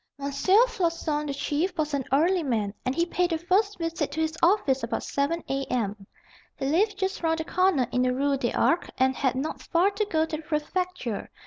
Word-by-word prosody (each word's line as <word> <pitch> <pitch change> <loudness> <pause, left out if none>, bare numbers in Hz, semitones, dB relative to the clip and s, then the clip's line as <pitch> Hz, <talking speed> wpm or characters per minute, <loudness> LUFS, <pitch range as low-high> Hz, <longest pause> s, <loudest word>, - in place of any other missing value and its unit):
Floçon, 335 - +1
the 280 - -2
Chief, 325 +6 -1
was 305 -1 -1
an 275 -3 -1
early 340 +7 +3
man, 220 -8 -1
and 255 - 0
he 335 - +2
paid 355 0 0
a 325 - +1
first 380 +5 +1
visit 330 -3 -2
to 315 - -3
his 320 0 0
office 330 -8 +3
about 230 - -3
7 290 +4 -1
A.M. 225 -7 -2 0.5
He - - -3
lived 390 +8 +2
just 385 -1 -2
round 325 -1 +1
the 320 - -3
corner 365 -8 +2
in 250 - +1
the 255 0 +2
Rue 275 +2 +1
des 250 -3 -1
Arcs, 340 +1 +1
and 260 0 +2
had 265 -2 0
not 280 +4 -3
far 360 +4 +2
to 415 +1 -1
go 320 -5 +1
to 320 -1 -4
the - - -8
Prefecture. 310 - -3
315 Hz, 205 wpm, -26 LUFS, 275-360 Hz, 0.5 s, early